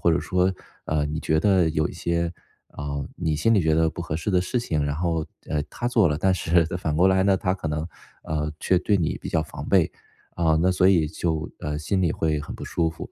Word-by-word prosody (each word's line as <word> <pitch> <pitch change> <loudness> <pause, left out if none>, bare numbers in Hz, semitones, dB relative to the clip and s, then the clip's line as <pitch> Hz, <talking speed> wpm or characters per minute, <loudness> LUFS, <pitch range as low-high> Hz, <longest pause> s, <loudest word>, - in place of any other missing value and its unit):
或 85 - +3
者 80 - +2
说， 90 +1 +1 0.3
呃， 75 -1 0
你 80 +2 -3
觉 80 0 +1
得 95 -3 +3
有 80 -1 +1
一 - - -8
些 85 0 -1 0.4
呃， 70 -1 -5
你 80 -2 -1
心 115 +9 +2
里 100 - +4
觉 80 -1 +2
得 80 0 +3
不 80 - -8
合 80 -2 -3
适 95 +5 -2
的 90 -1 +3
事 120 +7 -1
情。 80 -11 -1
然 75 0 -1
后， 80 -2 -1 0.2
呃， 75 -1 -1
她 120 - -4
做 110 -7 +4
了， 75 - 0
但 95 +3 +2
是 85 -1 +2
反 75 -3 -2
过 90 +3 +5
来 95 0 +3
呢， 100 -1 +4
她 90 0 0
可 85 -4 -4
能， 75 +2 -2 0.4
呃， 75 -1 -2
却 95 - +3
对 100 +2 +2
你 80 -4 -1
比 - - -7
较 80 - +1
防 80 - -8
备。 - - +4 0.4
啊， 80 -2 +2
那 95 0 +3
所 90 +1 +4
以 85 -5 +4
就， 80 -1 -2
呃， 75 0 -3
心 95 +5 -1
里 85 -3 +2
会 80 -3 0
很 75 - -7
不 - - -7
舒 80 -1 0
服。 80 - -8
80 Hz, 265 characters per minute, -24 LUFS, 75-90 Hz, 0.4 s, 过